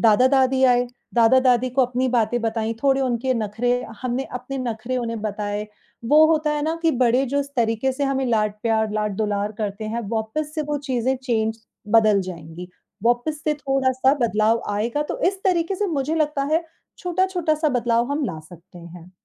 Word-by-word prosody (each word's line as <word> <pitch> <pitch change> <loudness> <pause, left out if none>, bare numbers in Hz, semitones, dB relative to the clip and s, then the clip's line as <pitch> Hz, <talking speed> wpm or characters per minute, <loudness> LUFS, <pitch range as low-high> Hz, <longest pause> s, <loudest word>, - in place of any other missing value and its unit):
दादा-दादी 260 +4 +4
आए, 245 -1 +4 0.3
दादा-दादी 250 +1 +4
को 265 +2 +2
अपनी 250 +1 -1
बातें 240 -1 +1
बताई, 225 0 -1
थोड़े 270 -1 +3
उनके 255 0 0
नखरे 225 +2 -1 0.3
हमने 255 +2 -1 0.2
अपने 270 +2 -6
नखरे 245 +1 -3
उन्हें 230 -2 -3
बताएँ, 210 0 -3 0.4
वो 300 +6 +6
होता 305 -1 +1
है 295 - -2
ना 320 +2 -1
कि 330 - +4
बड़े 250 +3 +3
जो 285 +3 0
इस 280 - -6
तरीके 230 +3 +1
से 280 +2 -2
हमें 270 -1 0
लाड़-प्यार, 220 0 0
लाड़-दुलार 210 0 -1
करते 210 0 -3
हैं, 235 - -1
वापस 230 +8 -3
से 310 - -1
वो 290 - 0
चीज़ें 255 +1 +1
चेंज 225 -2 -1 0.3
बदल 215 -3 +5
जाएँगी, 175 0 -8 0.4
वापस 245 +6 +1
से 305 -1 +1
थोड़ा-सा 270 -1 +1
बदलाव 220 +2 +1
आएगा, 235 +8 -1
तो - - -5
इस 390 0 -5
तरीके 360 0 +1
से 415 - 0
मुझे 290 +4 -1
लगता 300 -3 0
है, 330 +1 +2 0.3
छोटा-छोटा-सा 350 -4 0
बदलाव 240 0 +1
हम 290 -1 -1
ला 160 - -4
सकते 175 +3 -15
हैं। 170 +1 -12
245 Hz, 170 wpm, -22 LUFS, 220-275 Hz, 0.4 s, वो